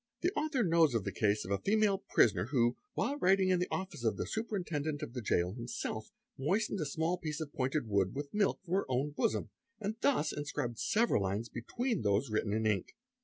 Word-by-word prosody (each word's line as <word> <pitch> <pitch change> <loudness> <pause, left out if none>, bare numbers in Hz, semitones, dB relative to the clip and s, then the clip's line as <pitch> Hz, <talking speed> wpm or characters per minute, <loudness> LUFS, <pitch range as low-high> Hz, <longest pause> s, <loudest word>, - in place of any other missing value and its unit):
The 355 - +2
author 295 -4 +1
knows 165 - +4
of 110 - +1
the - - -3
case 105 -1 +1
of 95 - -6
a 100 - +1
female 205 -1 +2
prisoner 100 - +3
oy - - -12
ho, 120 0 +3 0.2
while 285 +1 0
writing 190 -2 +4
in 185 -1 +3
the 180 - 0
office 190 -10 -4
of 110 -4 +1
the - - -2
Superintendent 170 -9 -2
of 115 - -6
the 125 - -4
Jail 90 -4 +1
himself, 115 -2 -4 0.3
'moistened 195 +8 0
a 155 - -1
small 160 +5 -1
piece 155 -3 -4
of 155 -2 -5
pointed 130 0 -1
wood 100 -1 +1
with 140 0 -5
milk 210 -1 +1
from 175 - -4
her 195 - +2
own 130 +4 0
bosom, 110 -7 0
_ - - -18 0.3
and 215 0 -2
thus 265 - +2
inscribed 145 -5 -3
several 230 - +2
lines 100 +4 -2
between 230 - -2
those 105 +4 +1
written 110 -1 0
in 110 +1 0
ink. 105 -4 0
145 Hz, 220 wpm, -33 LUFS, -, 0.3 s, knows